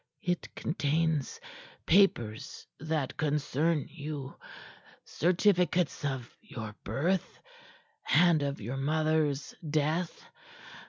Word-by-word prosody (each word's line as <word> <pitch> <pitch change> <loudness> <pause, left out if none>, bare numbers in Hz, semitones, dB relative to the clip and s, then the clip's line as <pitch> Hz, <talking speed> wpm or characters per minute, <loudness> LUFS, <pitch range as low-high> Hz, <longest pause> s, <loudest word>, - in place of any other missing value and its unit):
"It 175 -1 -1
contains 155 -2 0 0.5
papers 120 - +2
that 155 -2 -2
concern 150 +1 +1
you 145 -4 -6 0.7
certificates 180 -1 +2
of 130 -4 -3
your 110 -2 -7
birth 160 - -1 0.7
and 170 -3 +5
of 140 0 -2
your 120 +5 -4
mothers 155 0 +1 0.2
death. 155 +3 0
155 Hz, 85 wpm, -30 LUFS, 140-165 Hz, 0.7 s, and